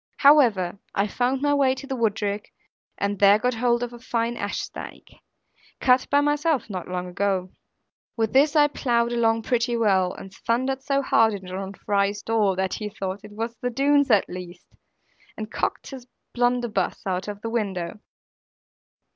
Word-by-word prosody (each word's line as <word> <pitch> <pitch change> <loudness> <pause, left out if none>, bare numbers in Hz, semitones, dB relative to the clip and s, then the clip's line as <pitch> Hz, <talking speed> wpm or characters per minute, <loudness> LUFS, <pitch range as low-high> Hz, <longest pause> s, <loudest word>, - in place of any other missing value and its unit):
However, 230 -11 +4 0.2
I 200 - +2
found 250 +5 -1
my 290 0 +3
way 270 -2 +3
to 265 +1 -8
the 270 -1 -4
woodrick, 210 -3 -1 0.5
and 200 -1 -2
there 200 0 +7
got 250 +3 0
hold 240 +1 +1
of 240 0 -5
a 240 - -10
fine 235 0 -2
ash 205 -3 -3
stake, - - -9 0.6
cut 255 0 +3
by 285 0 +4
myself 295 -4 0
not 185 -3 -5
long 180 0 -3
ago. 185 0 -1 0.7
With 225 -1 0
this 285 +3 +4
I 295 -1 +6
ploughed 240 -5 0
along 225 -1 +2
pretty 240 0 0
well, 190 -5 +2
and 195 - -10
thundered 260 +3 -1
so 275 +1 0
hard 225 -4 +3
at 195 - -8
John 190 +2 -6
Fry's 200 +1 -1
door, 215 -4 +1
that 190 0 -1
he 210 -1 -4
thought 195 -1 -5
it 210 - -12
was 230 +2 -4
the 245 - -2
Doones 280 +3 +2
at 210 -4 +4
least, 180 0 -9 0.7
and 215 0 -6
cocked - - -3
his 255 -2 -9 0.3
blunderbuss 245 -5 0
out 185 0 -2
of 205 -1 -6
the 225 - -3
window. 200 -4 -3
225 Hz, 170 wpm, -24 LUFS, 200-250 Hz, 0.7 s, there